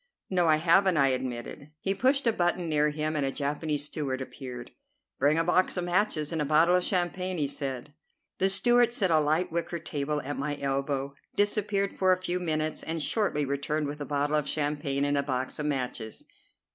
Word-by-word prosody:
"No, 180 -2 +2
I 155 - +6
haven't," 175 +3 +4
I 135 -1 +4
admitted. 130 +3 -4
He 195 - 0
pushed 260 +7 +2
a 230 - +3
button 175 -2 0
near 150 -1 +2
him, 155 +1 -2
and 145 - 0
a 135 - 0
Japanese 145 +1 -2
steward 140 -3 -3
appeared. 130 -2 -8 0.5
"Bring 150 +2 +3
a 165 - +3
box 180 +2 +2
of 180 - 0
matches 175 -4 0
and 160 -2 -1
a - - +2
bottle 155 +4 +4
of 180 - +2
champagne," 180 0 -1
he 150 - +1
said. 135 0 -4 0.5
The 190 - +3
steward 240 +4 +4
set 195 -7 +1
a 160 - +5
light 155 +4 +1
wicker 170 +1 -2
table 150 -2 -3
at 145 +1 -4
my 145 +1 -2
elbow, 140 0 -1 0.2
disappeared 205 -1 +1
for 185 -1 +3
a 185 - +4
few 180 0 -2
minutes, 155 -3 -1
and 165 +1 -3
shortly 150 -2 0
returned 140 +2 -1
with 145 +1 -5
a - - -3
bottle 145 +1 0
of 150 -2 -1
champagne 145 -2 -1
and 145 0 +1
a - - +3
box 130 -1 -3
of 150 - -1
matches. 125 -6 -3
150 Hz, 200 wpm, -28 LUFS, 140-180 Hz, 0.5 s, I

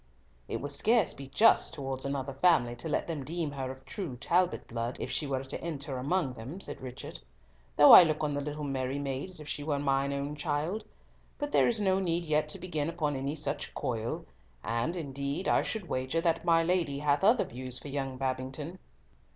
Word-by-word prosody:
"It - - -3
would 145 - -4
scarce 220 +5 +3
be 140 0 -9
just 220 +12 +4
towards 135 -1 -4
another 140 0 -2
family 135 -5 +3
to 160 - -4
let 150 - 0
them 160 -5 -4
deem 165 +1 -2
her 135 -2 -4
of 130 0 -9
true 175 - -5
Talbot 175 +7 +1
blood, 115 +1 -3
if - - -3
she 150 - +1
were 135 -1 -1
to 135 - -5
enter 145 -5 -4
among 145 0 0
them," 130 +10 -8
said - - -5
Richard; 125 - -7 0.6
"though 145 - +9
I - - +13
look 155 -3 +1
on 150 -1 0
the 145 - -1
little 150 +1 -4
merry 135 -1 -2
maid 140 +3 -3
as 185 - -8
if 150 - -9
she 150 - -3
were 145 -1 0
mine 140 -1 +1
own 140 +1 -3
child. 155 +7 -2 0.5
But 290 -1 -3
there - - +5
is 235 -2 +2
no 190 -2 +2
need 170 -2 0
yet 155 -1 +1
to 195 - -3
begin 160 -4 -2
upon 155 -4 -1
any 135 +3 -2
such 145 -2 -4
coil; 115 -4 -3 0.4
and, 115 +9 -1
indeed, 140 +1 -3
I - - +3
would 215 -5 -5
wager 130 +4 -1
that 165 -1 +1
my 165 -1 +4
lady 165 -5 +1
hath 145 +3 +1
other 220 +4 +5
views 125 +1 -6
for 145 - -7
young 135 -2 -3
Babington." 135 +6 -3
145 Hz, 210 wpm, -30 LUFS, 135-170 Hz, 0.6 s, I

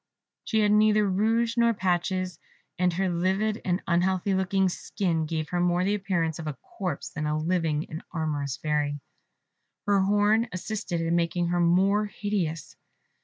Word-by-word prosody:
She 220 -1 +1
had 210 -1 +3
neither 210 0 +4
rouge 225 +5 +1
nor 235 -1 +3
patches; 185 -1 -1 0.4
and 180 0 +3
her 190 +2 0
livid 190 +5 0
and 180 0 -1
unhealthy 185 +2 +1
looking 190 0 +2
skin, 170 -3 -2
gave 160 -1 -3
her 175 - -1
more 175 0 +2
the 200 +2 +1
appearance 185 -6 -1
of 160 - -5
a 150 - -3
corpse 180 -7 -5
than 155 0 -4
of 150 0 0
a - - -4
living 165 -3 0
and 155 - -7
amorous 145 -4 -2
Fairy. 145 -1 -1 0.9
Her 205 -1 +3
horn 205 +4 +3
assisted 180 -2 -3
in 165 +1 0
making 170 0 0
her 175 0 +1
more 190 +5 +3
hideous. 195 -7 -3
180 Hz, 165 wpm, -27 LUFS, 165-205 Hz, 0.9 s, neither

